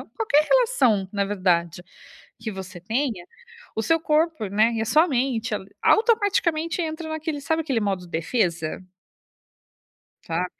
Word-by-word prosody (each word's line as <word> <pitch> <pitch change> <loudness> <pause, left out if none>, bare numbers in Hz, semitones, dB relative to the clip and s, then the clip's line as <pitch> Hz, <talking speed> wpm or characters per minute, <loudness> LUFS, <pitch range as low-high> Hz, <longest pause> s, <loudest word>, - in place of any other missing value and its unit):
ou - - -10
qualquer 305 -10 +2
relação 265 - +3
na 200 -1 0
verdade, 175 -4 0 0.6
que 220 -1 -5
você 190 -1 -8
tenha, 220 -1 -2 0.5
o 220 - 0
seu 330 +8 +2
corpo, 310 -6 +1
né, 215 +4 +3
e 225 - -2
a - - 0
sua 310 +10 +4
mente, 240 -5 -1
ali, 195 -1 -6
automaticamente 375 -8 +2
entra 315 0 -4
naquele 315 -1 -3
sabe 320 +3 0
aquele 270 -7 -1
modo 195 -4 -2
defesa? 170 -1 -1 1.5
Sabe? 170 +2 -1
235 Hz, 140 wpm, -24 LUFS, 190-315 Hz, 1.5 s, sua